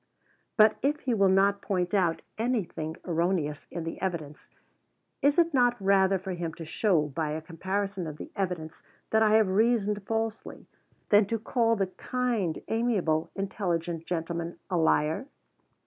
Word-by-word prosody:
But 215 0 +6
if 295 +3 0
he 255 - 0
will 200 -3 +4
not 200 +1 +3
point 180 -2 -1
out 175 -5 +1
anything 210 -9 -2
erroneous 170 -4 -1
in 170 - -5
the 165 - -6
evidence, 165 -6 -4 0.7
is 285 +2 +3
it 335 -2 +3
not 245 -2 +3
rather 195 -1 +3
for 190 +1 -6
him 170 -2 -4
to 165 - -8
show 170 -1 +2
by 150 +2 -2
a 155 - -2
comparison 190 +3 -3
of 150 -1 -7
the - - -9
evidence 180 -5 -3 0.3
that 220 - +4
I 215 -1 +5
have 220 -2 +5
reasoned 210 0 +2
falsely, 225 0 -3 0.4
than 205 -1 +5
to 230 - -1
call 230 +1 +1
the 195 -3 +1
"kind, 225 -3 -2
amiable, 205 -9 0
intelligent 175 -4 -2
gentleman" 170 0 -3
a 180 - +1
liar? 160 - +2
190 Hz, 155 wpm, -28 LUFS, 165-220 Hz, 0.7 s, But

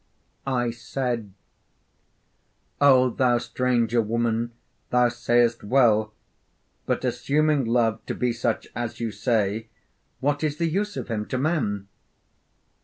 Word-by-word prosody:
I 120 -3 0
said, 120 -2 -3 1.5
'O 130 -3 +6
thou 125 0 +2
stranger 120 -1 +1
woman, 115 +1 -1 0.4
thou 125 0 +4
sayest 120 -1 +1
well; 110 -2 +3 0.8
but, - - 0
assuming 140 +3 +1
Love 115 -1 +1
to - - -2
be 125 -1 0
such 115 -1 -1
as 120 -2 -4
you 115 -2 -2
say, 110 -1 0 0.5
what 145 +2 0
is 150 -1 -1
the 170 - +1
use 205 +3 -1
of - - -4
him 105 -2 -3
to 130 - -2
men?' 125 - -1
120 Hz, 120 wpm, -25 LUFS, 115-130 Hz, 1.5 s, O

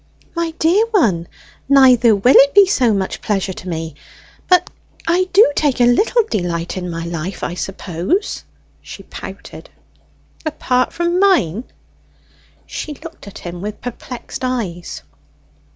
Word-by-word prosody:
"My 335 -1 -1
dear 380 +8 +3
one, 215 - +1 0.4
neither 250 -5 +6
will 245 +7 +4
it 280 +4 +6
be 405 -1 +8
so 260 - +2
much 195 -2 -2
pleasure 195 -2 -1
to 185 - -8
me... 160 -2 -4 0.6
But 360 -1 +4 0.3
I 365 +2 +1
do 390 -6 +6
take 290 -5 +1
a - - +5
little 425 - +3
delight 175 - -2
in 180 -1 -4
my 165 0 -5
life, 170 +2 -5
I - - -2
suppose," 190 - -3 0.4
she - - -10
pouted. - - -10 0.7
"Apart 255 -5 0
from 345 +1 0
mine?" 255 - +2 1.0
She 300 - -6
looked 320 -6 -12
at 200 - -10
him 175 0 -7
with 210 +1 -5
perplexed 245 +1 -7
eyes. 200 - -3
245 Hz, 135 wpm, -18 LUFS, -, 1.0 s, be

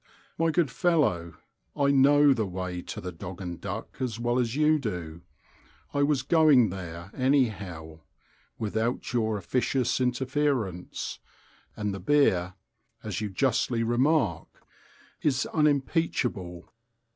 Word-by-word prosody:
My 165 0 +1
good 160 -3 +1
fellow, 90 - +1 0.4
I 140 -1 +2
know 140 +1 +6
the 110 -5 -1
way 90 -1 -4
to - - -7
the 90 - -6
Dog 90 +2 -8
and 90 -3 -6
Duck 100 +3 -6
as 120 -4 -3
well 120 +1 +1
as 120 -1 -1
you 155 +1 +3
do: 85 - -5 0.7
I 145 - +1
was 140 -3 +2
going 145 - +5
there 90 -1 -7
anyhow, 100 - -1 0.6
without 110 +4 -2
your 110 -3 +1
officious 125 +5 0
interference—and 125 - -3
the 100 - -5
beer, 95 -6 +2 0.5
as - - -4
you 105 - -2
justly 120 +2 +1
remark, 120 - 0 0.6
is 140 -2 +1
unimpeachable. 135 - 0
120 Hz, 120 wpm, -27 LUFS, 95-140 Hz, 0.7 s, know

